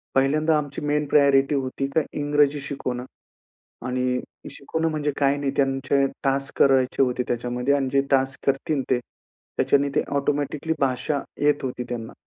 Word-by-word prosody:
पहिल्यांदा 155 +4 +3
आमची 145 -2 -4
main 150 0 0
priority 140 -1 +4
होती 135 0 -2
का 160 - +5 0.2
इंग्रजी 145 0 +2
शिकवणं 130 -3 -4 0.8
आणि 125 0 0 0.3
शिकवणं 160 +4 -2
म्हणजे 150 -1 -1
काही 140 0 +2
नाही 140 -1 -1
त्यांचे 135 0 +1 0.2
टास्क 135 0 -1
करायचे 135 -1 +3
होते 125 -1 +1
त्याच्यामध्ये 125 +3 0
आणि 135 -2 0
जे 140 - +4
टास्क 135 -1 +1
करतील 135 +1 0
ते, 130 - +3 0.6
त्याच्याने 140 0 +2
ते - - +3
ऑटोमॅटिकली 145 +2 -1
भाषा 135 +2 0 0.2
येत 145 0 +3
होती 125 -2 -4
त्यांना. 115 -2 -5
140 Hz, 145 wpm, -24 LUFS, 130-145 Hz, 0.8 s, का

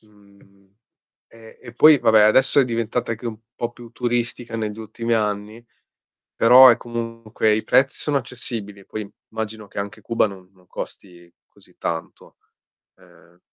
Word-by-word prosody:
mhmm, 100 -2 -25 0.6
e 115 -1 -17
e 120 - -12
poi 155 +4 +7
vabbè 110 -3 +4
adesso 130 +6 +5
è 135 - +3
diventata 115 0 -2
anche 115 +2 -5
un 115 -2 -5 0.2
po' 120 0 -4
più 120 -1 -14
turistica 120 -1 -3
negli 110 -1 -4
ultimi 115 +2 -4
anni, 105 +1 -3 0.7
però 125 +3 +8
è 120 - +6
comunque 115 -2 -2
i 110 - -1
prezzi 135 0 +2
sono 145 -2 0
accessibili, 115 -6 -5
poi 105 0 -7 0.2
immagino 110 -1 -6
che - - -9
anche 100 +2 -6
Cuba 115 +2 +1
non 95 -3 -11
non 90 -1 -26
costi 85 -1 -10
così - - -24
tanto. 80 -1 -6 0.6
Ehm 85 +1 -23
110 Hz, 150 wpm, -21 LUFS, 105-120 Hz, 0.7 s, però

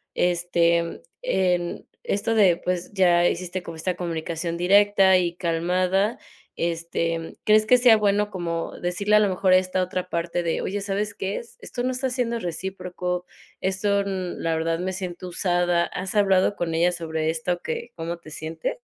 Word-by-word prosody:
este, 170 -1 +1 0.2
en 180 -2 0 0.2
esto 205 +3 -1
de, 195 -6 +5
pues, 180 +1 -3
ya 175 -2 +4
hiciste 180 +1 -3
como 165 -2 -8
esta 175 +3 -2
comunicación 170 0 -3
directa 195 +1 +5
y 175 -1 0
calmada. 180 +4 +1 0.4
Este, 165 0 -1
em, 165 0 -6
¿crees 215 0 +5
que 250 +3 +6
sea 240 -3 +6
bueno 205 0 +2
como 170 -2 -4
decirle 200 +4 +2
a - - +6
lo 210 - +3
mejor 185 0 +1
esta 185 0 +3
otra 185 0 -4
parte 170 +1 -1
de: 165 -1 -1
"Oye, 205 +2 -2
¿sabes 205 +1 -2
qué 195 +1 -3
es? 235 - -10
Esto 245 - -5
no 255 - 0
está 260 +1 -1
siendo 240 -2 -1
recíproco. 180 -1 -4 0.3
Esto, 190 +2 -1
um, 190 -2 -3
la 165 -1 0
verdad, 165 +1 -1
me 185 +1 -2
siento 180 -1 -5
usada". 175 -1 +1
¿Has 190 +3 -5
hablado 200 -1 +3
con 165 -2 -2
ella 175 +2 +2
sobre 160 -2 -2
esto 175 +2 -1
que 470 0 -5
cómo 170 +1 -4
te 155 - -13
sientes? 160 +1 -4
180 Hz, 170 wpm, -24 LUFS, 170-195 Hz, 0.4 s, que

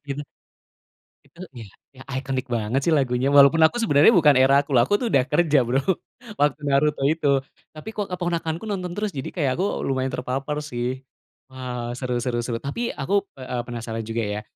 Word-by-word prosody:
Gitu? 140 +1 -4 1.1
Itu 170 - -19 0.2
ya 115 - -8 0.3
ya, - - -10 0.2
iconic 135 0 -3
banget 110 +5 -1
sih, 170 - +3
lagunya. 125 -2 0
Walaupun 140 +3 +7
aku 160 - -4
sebenarnya, 150 -1 +5
bukan 150 -4 +5
era 135 +1 +5
aku 145 - -19
loh. 125 - +5
Aku 205 - +1
tuh 245 - -1
udah 130 -2 +4
kerja 150 -2 +3
Bro, 125 +3 +1 0.6
waktu 145 0 +2
Naruto 140 +1 +1
itu. 160 -2 -3 0.5
Tapi 155 +6 -10
kok 205 -2 -2
keponakanku 175 -1 -3
nonton 180 -3 -3
terus? 210 0 -2
Jadi 130 - -4
kayak, 145 -6 +1
aku 185 - +1 0.2
lumayan 130 -1 -1
terpapar 130 +4 -3
sih. 120 0 -3 0.6
Wah. 125 -2 -6
Seru 125 -2 -3
seru 125 -2 -1
seru. 115 -1 -2
Tapi 140 +12 -4 0.2
aku, 135 +8 -3 0.3
eee, 130 -1 -9
a - - -6
penasaran 115 -2 -5
juga, 115 +1 -2
ya 105 - -3
140 Hz, 185 wpm, -23 LUFS, 125-160 Hz, 1.1 s, Walaupun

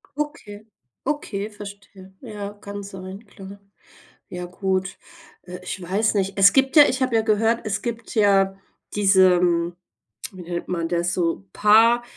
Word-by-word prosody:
Okay, 215 -8 -6 0.4
okay, 220 -8 -3
verstehe. 200 -2 -12
Ja, 205 -4 -7
kann 205 -1 -8
sein. 190 +2 -9
Klar, 200 -1 -12 0.7
ja 180 0 -6
gut. 190 +1 -2 0.5
Äh, 180 0 -9
ich 185 +1 -6
weiß 205 +5 0
nicht, 195 0 -1
es 195 0 +6
gibt 270 0 +2
ja 295 - +10
ich 260 +1 -2
habe 255 -3 +1
ja 225 - +4
gehört, 225 +2 +1
es 200 -1 -2
gibt 235 0 -6
ja 195 -2 +3 0.4
diesen, 180 -4 +3 0.6
wie 185 - -11
nennt 175 0 -5
man 170 -2 -2
das? 175 +1 -1
So 175 +2 -1
paar, 225 +3 +5
200 Hz, 150 wpm, -22 LUFS, 185-215 Hz, 0.7 s, ja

